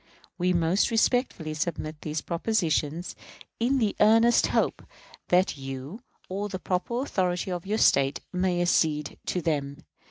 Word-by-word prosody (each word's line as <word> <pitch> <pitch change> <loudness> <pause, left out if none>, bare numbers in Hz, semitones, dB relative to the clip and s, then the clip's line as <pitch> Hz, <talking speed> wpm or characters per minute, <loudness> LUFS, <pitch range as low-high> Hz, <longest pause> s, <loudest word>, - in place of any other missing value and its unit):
We 180 +1 +2
most 170 +2 +2
respectfully 225 - +1
submit 155 -1 -4
these 155 0 -3
propositions, 170 -3 -1 0.4
in 250 +4 +2
the 220 -5 0
earnest 225 +3 +5
hope - - 0 0.5
that 180 -3 +2
you, 135 - -7 0.3
or 200 +2 -3
the 190 - -4
proper 185 +8 -2
authority 185 -7 -1
of 175 +1 -5
your 215 +2 0
State, 135 -8 +3
may 180 -1 +1
accede 150 -4 +1
to 180 - -1
them. 140 -3 -1
180 Hz, 135 wpm, -27 LUFS, 155-205 Hz, 0.5 s, earnest